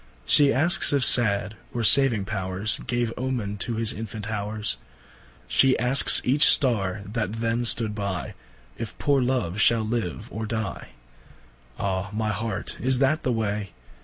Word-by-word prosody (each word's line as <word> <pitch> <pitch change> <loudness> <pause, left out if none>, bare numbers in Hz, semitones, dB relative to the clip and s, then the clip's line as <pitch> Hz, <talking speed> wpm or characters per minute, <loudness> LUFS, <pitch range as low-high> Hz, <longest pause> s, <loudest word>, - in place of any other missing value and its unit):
Shee 145 - +5
askes 160 +3 +3
if 140 -2 +3
sad, 105 -2 +2 0.2
or 120 - -2
saving 115 -3 +4
powers, 95 0 -2
Gave 120 -2 -1
Omen 120 -6 -3
to 115 +4 -4
his 110 0 0
infant 110 -1 -7
howers, 105 0 -4 0.7
Shee 135 -1 +3
askes 125 +3 +6
each 140 +4 +4
starre 100 -7 +1
that 110 -1 -4
then 115 +1 -2
stood 115 -2 +1
by, 100 -5 -5 0.5
If 115 -2 -7
poore 140 -2 +1
Love 120 -7 -1
shall 115 0 +3
live 110 -1 -4
or 110 +1 -5
dy. 110 0 -5 0.8
Ah 95 0 -3
my 110 0 -2
Heart, 105 -2 -5
is 130 +1 +1
that 140 +4 +1
the 130 - -1
way? 105 -3 -3
110 Hz, 150 wpm, -24 LUFS, 105-125 Hz, 0.8 s, askes